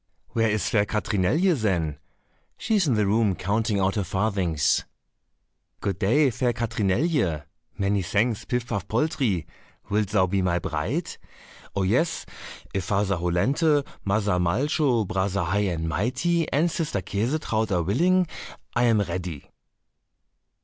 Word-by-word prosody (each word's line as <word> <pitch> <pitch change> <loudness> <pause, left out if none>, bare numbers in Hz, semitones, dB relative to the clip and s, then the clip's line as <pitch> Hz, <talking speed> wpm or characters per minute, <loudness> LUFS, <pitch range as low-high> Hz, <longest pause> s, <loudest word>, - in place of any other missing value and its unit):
"Where 115 -1 +1
is 105 0 0
fair 105 -2 +3
Katrinelje, 110 - +1
then?" 85 - -1 0.6
"She 230 - -2
is 190 -5 +2
in 125 - +2
the 105 -1 +2
room 105 -1 +2
counting 105 +2 0
out 95 0 +2
her 105 - -1
farthings." 95 -6 +1 1.0
"Good 95 -4 -2
day, 135 +8 +3
fair 120 +1 0
Katrinelje." 110 - 0 0.3
"Many 100 0 +1
thanks, 105 +5 0
Pif 125 -1 -1
paf 100 -5 -3
poltrie." 120 - 0 0.5
"Wilt 105 0 +2
thou 95 -1 +3
be 95 +1 0
my 90 -2 +1
bride?" 80 -3 -3 0.6
"Oh, 100 - +1
yes, 150 - +1 0.5
if 95 -3 -2
Father 100 -1 +1
Hollenthe, 135 - +2 0.2
Mother 100 -2 +1
Malcho, 120 - +1
Brother 95 -1 0
High 100 +5 +1
and 80 -2 -2
Mighty, 130 - 0
and 165 +4 +2
Sister 150 - -2
Käsetraut 110 - -1
are 90 -2 +1
willing, 180 - +3 0.5
I 120 0 +3
am 115 -3 +4
ready." 90 -5 -5
105 Hz, 135 wpm, -25 LUFS, 95-125 Hz, 1.0 s, am